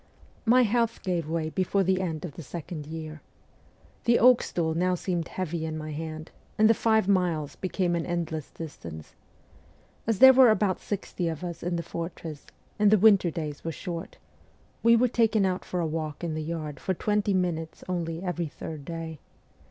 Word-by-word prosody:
My 250 +2 +6
health 230 0 0
gave 175 -5 -1
way 160 -1 -1
before 190 +2 +1
the 190 0 +1
end 160 -3 -3
of 170 - -6
the 170 - -8
second 155 +1 -7
year. 155 -1 -7 0.8
The 235 0 +5
oak 250 0 +6
stool 160 -2 -1
now 180 +2 +1
seemed 175 -2 -2
heavy 170 -3 -3
in 160 -1 -3
my 155 0 -5
hand, 155 +1 -6 0.3
and 215 0 +6
the 225 - +6
five 220 -3 +2
miles 170 -7 +1
became 185 -2 -1
an 170 - -2
endless 165 -3 -3
distance. 85 - -9 0.9
As 225 -3 +2
there 265 +3 +10
were 260 -2 +7
about 205 -3 +2
sixty 195 -3 -3
of 160 0 -4
us 170 -2 -5
in 175 0 -1
the 170 - -2
fortress, 165 -3 -6 0.3
and 210 -1 +5
the 215 - +6
winter 200 -3 +5
days 150 -3 -5
were 165 - -2
short, 170 +3 -6 0.6
we 230 0 +6
were 245 +2 +4
taken 225 -3 +2
out 185 0 -1
for 180 - -3
a 170 - 0
walk 155 0 -4
in 165 -2 -2
the 155 - -3
yard 155 -3 -4
for 190 - -1
twenty 210 +1 +1
minutes 165 -3 -2
only 170 -1 -3
every 175 -2 -2
third 150 0 -8
day. 165 0 -6
175 Hz, 185 wpm, -27 LUFS, 160-195 Hz, 0.9 s, there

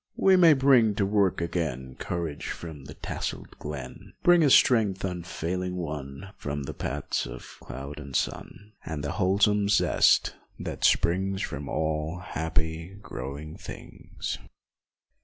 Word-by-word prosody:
51. - - -3
We 190 - +8
may 170 -4 +8
bring 130 -6 +5
to 100 - +1
work 100 -3 +2
again 75 -7 -2
Courage 85 -4 -3
from 80 -5 -7
the - - -10
tasselled - - -5
glen, 70 -4 -7
Bring 175 -1 +6
a 145 - +5
strength 110 -7 +5
unfailing 90 0 -3
won 75 -1 -5
From 70 0 -4
the - - -5
paths - - -2
of - - -10
cloud 70 +3 -7
and 70 -3 -8
sun, 100 +3 -3
And 75 -2 -4
the 70 - -2
wholesome 100 +1 +3
zest 105 - +4 0.2
that - - -6
springs 95 +3 +2
From 70 -1 -5
all 80 +1 -1
happy, 80 0 -3
growing 70 +4 -6
things. - - -7
85 Hz, 140 wpm, -27 LUFS, 75-100 Hz, 0.2 s, We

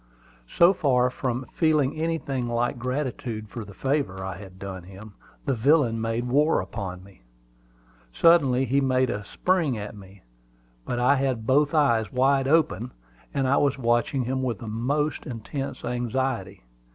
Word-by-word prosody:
So 170 +3 +5
far 125 -8 +2
from 125 0 -3
feeling 155 -4 +2
anything 155 -6 -2
like 120 +1 -1
gratitude 125 -4 -3
for 115 0 -6
the 100 -2 -12
favor 130 -9 -1
I 95 - -4
had 95 -1 -12
done 95 -1 -7
him, 100 +4 -12 0.3
the - - +1
villain 125 -2 +3
made 115 +2 -1
war 150 +5 +3
upon 95 -4 -6
me. 95 -7 -18 0.9
Suddenly 135 - +4
he 135 +3 +2
made 130 -1 +2
a 105 +1 -4
spring 165 - 0
at 105 +1 -6
me; 95 -1 -14 0.6
but 120 - -2
I 125 +4 +3
had 130 -4 -1
both 145 +5 +3
eyes 115 -8 +2
wide 135 +1 +2
open, 135 - +1 0.4
and 135 -1 0 0.2
was 140 -2 +1
watching 120 +1 +1
him 130 +2 -2
with 125 -4 -1
the 115 - -9
most 140 +9 -1
intense 135 +3 -5
anxiety. 120 - -2
125 Hz, 150 wpm, -25 LUFS, 110-140 Hz, 0.9 s, So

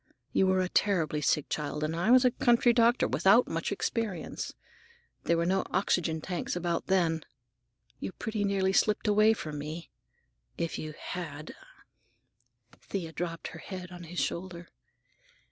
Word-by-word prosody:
You 190 - +3
were 185 0 +3
a 185 - 0
terribly 165 -6 +1
sick 150 0 +1
child, 150 0 -3
and 155 +1 -1
I 175 +6 0
was 255 +1 +7
a 250 - +5
country 240 0 +4
doctor 235 +1 +4
without - - +4
much - - -2
experience. 215 -8 -3 0.7
There 170 - +3
were 170 - +1
no 190 +2 +2
oxygen 170 -4 0
tanks 180 +1 -3
about 175 -1 -2
then. 165 -4 +2 0.8
You - - -4
pretty 215 +2 -3
nearly 195 -1 +1
slipped 210 +2 +2
away 215 +1 +5
from 155 -8 -5
me. 155 +3 -7 0.7
If 170 -1 -2
you 155 -1 -6
had—" 155 -4 -6 1.3
Thea 175 -5 -4
dropped 165 0 -4
her - - -10
head 185 -2 -7
on 175 -1 -9
his 175 +2 -5
shoulder. 175 -1 -3
180 Hz, 150 wpm, -29 LUFS, 165-200 Hz, 1.3 s, was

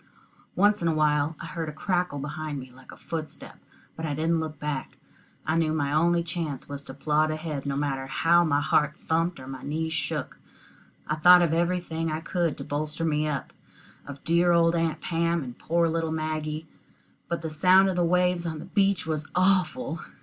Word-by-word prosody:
Once 205 +1 +3
in 170 - +1
a 165 - +2
while 150 0 +2
I - - -7
heard 165 -3 -4
a - - -5
crackle 175 0 -1
behind 150 +1 -4
me 130 -1 -10
like 130 +1 -15
a - - -12
footstep, 160 -2 -7 0.4
but 160 - -7
I 150 -3 -1
didn't 165 +2 +1
look 155 -1 -4
back. 145 -2 -4 0.5
I 155 - +1
knew 160 -2 +2
my 145 -2 0
only 170 +2 +3
chance 160 -5 -4
was 140 0 -6
to 135 - -8
plod 150 +2 +1
ahead, 155 -3 -4
no 140 - -1
matter 135 -2 -2
how 170 +5 +4
my 145 -3 +2
heart 150 +2 +2
thumped 165 +1 -1
or 130 - -9
my 130 -1 -7
knees 160 +2 -2
shook. 150 -1 -3 0.7
I - - -1
thought 180 +3 +8
of 165 -2 +1
everything 170 -1 0
I 155 - -2
could 170 -1 -1
to - - -6
bolster 150 +3 -3
me 155 -1 +1
up 140 -4 -3 0.5
of 140 -1 -9
dear 170 +1 +3
old 165 0 +4
Aunt 165 -2 0
Pam 170 -1 0
and 125 -2 -8
poor 170 0 +1
little 165 0 -1
Maggie. 155 0 -3 0.6
But 170 -1 -3
the 160 - -3
sound 185 +5 +5
of 190 - 0
the 175 - +2
waves 180 0 +2
on 160 -1 -3
the - - -8
beach 195 -3 +1
was 155 -1 -3
awful! 185 +1 +2
160 Hz, 200 wpm, -26 LUFS, 150-170 Hz, 0.7 s, thought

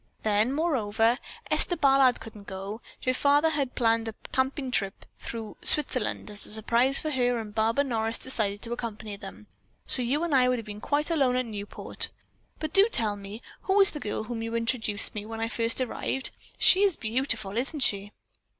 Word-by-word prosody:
Then, 215 +3 +2
moreover, 240 -6 +1 0.3
Esther 350 - +2
Ballard 270 -2 +4
couldn't 210 -3 -11
go. 195 +3 -6 0.2
Her - - 0
artist 255 - -3
father 290 +3 +4
had 280 -4 -1
planned 230 -1 +2
a 220 - -5 0.2
tramping 265 0 0
trip 195 -5 -1
through 225 -2 -6
Switzerland 255 -7 0
as 205 0 +3
a - - -3
surprise 235 +5 +2
for 310 - -3
her 245 -3 +1
and 215 -2 -6
Barbara 225 +6 +1
Morris 225 -3 -1
decided 210 -5 -1
to 235 0 -4
accompany 215 -3 -5
them; 105 - -11 0.4
so 255 - +4
you 270 +7 0
and 340 -3 -1
I 250 -2 +5
would 250 - +1
have 230 - -6
been 210 0 -8
quite 295 +5 0
alone 270 -6 +2
at 255 0 0
Newport. 205 -2 -3 0.5
But 310 -1 -4
do 395 +2 +7
tell 215 -3 +1
me 205 +3 -9 0.2
who 390 +1 +3
is 395 +1 +6
the 300 - -6
girl 215 -3 -3
to 220 - -13
whom 235 -2 -3
you 230 0 -4
introduced 230 -3 0
me 210 - -5
when 225 +1 -7
I 225 - 0
first 230 +1 0
arrived? 260 +1 -2 0.3
She 375 - +6
is 395 -4 +4
beautiful, 220 -3 -1
isn't 275 +5 +2
she?" 205 -4 0
230 Hz, 195 wpm, -27 LUFS, 215-270 Hz, 0.5 s, do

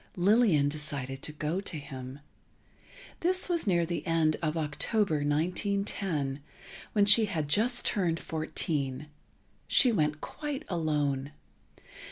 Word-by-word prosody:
Lillian 190 -6 +3
decided 140 -3 -3
to - - -3
go 155 +5 -3
to 185 -5 -4
him. 135 -1 -9 1.0
This 370 +2 +2
was 340 -9 0
near 175 -3 +2
the 170 -2 -4
end 160 -2 +2
of 155 -1 -1
October, 160 +4 0
1910, 160 -1 -1 0.5
when 205 -2 +4
she 215 +2 +7
had 165 -7 -3
just 230 +10 +3
turned 170 -5 0
fourteen. 155 -3 -3 0.6
She 255 - +5
went 150 -7 0
quite 295 - -6
alone. 145 -5 -1
160 Hz, 120 wpm, -29 LUFS, 145-200 Hz, 1.0 s, she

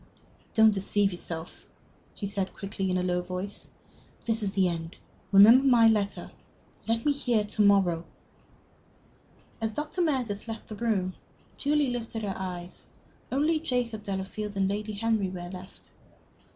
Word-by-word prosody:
"Don't 220 -1 +6
deceive 200 0 +1
yourself," 170 -2 -7 0.5
he 205 - -5
said, 195 -1 -3
quickly, 195 -1 -3
in 185 - +1
a 180 - 0
low 180 -1 0
voice; 185 +3 -6 0.6
"this 225 -1 0
is 200 -1 -2
the 190 -2 +4
end. 165 -1 -4 0.4
Remember 215 +6 +8
my 240 -4 +6
letter. 210 -2 0 0.6
Let 230 0 0
me 295 - +4
hear 245 -6 +1
to 210 +1 -2
morrow." 195 -5 +4 1.6
As 220 -1 -1
Dr. 300 - -3
Meredith 250 -11 -1
left 225 -1 -7
the 215 - -6
room, 205 -5 0 0.4
Julie 290 -2 +1
lifted 230 -2 -4
her 200 -2 -2
eyes. 180 -1 -7 0.4
Only 305 +4 +2
Jacob 245 -7 -2
Delafield 200 +1 -4
and 195 -1 +2
Lady 210 +2 -3
Henry 215 -2 0
were 175 -1 -6
left. 185 0 -11
205 Hz, 145 wpm, -28 LUFS, 190-230 Hz, 1.6 s, Remember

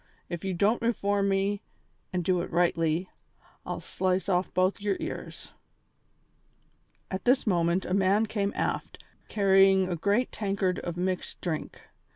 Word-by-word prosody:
If 175 -2 -5
you 190 -2 -2
don't 205 +6 +2
reform 205 -3 +1
me, 195 +1 0 0.5
and 180 -1 -1
do 180 -1 +2
it - - -5
rightly, 170 0 +1 0.6
I'll - - -4
slice 185 0 -1
off 180 -1 +1
both 185 +2 +1
your 200 -2 0
ears." - - -7 1.6
At 190 - -3
this 255 +2 +3
moment 175 -2 +1
a - - -2
man 200 +3 +3
came 205 -2 -1
aft, - - -3 0.3
carrying 195 -2 +4
a 180 - -1
great 205 +9 +1
tankard 195 -3 -1
of 175 0 -5
mixed 185 0 -2
drink. 160 -4 -4
190 Hz, 145 wpm, -28 LUFS, 180-200 Hz, 1.6 s, carrying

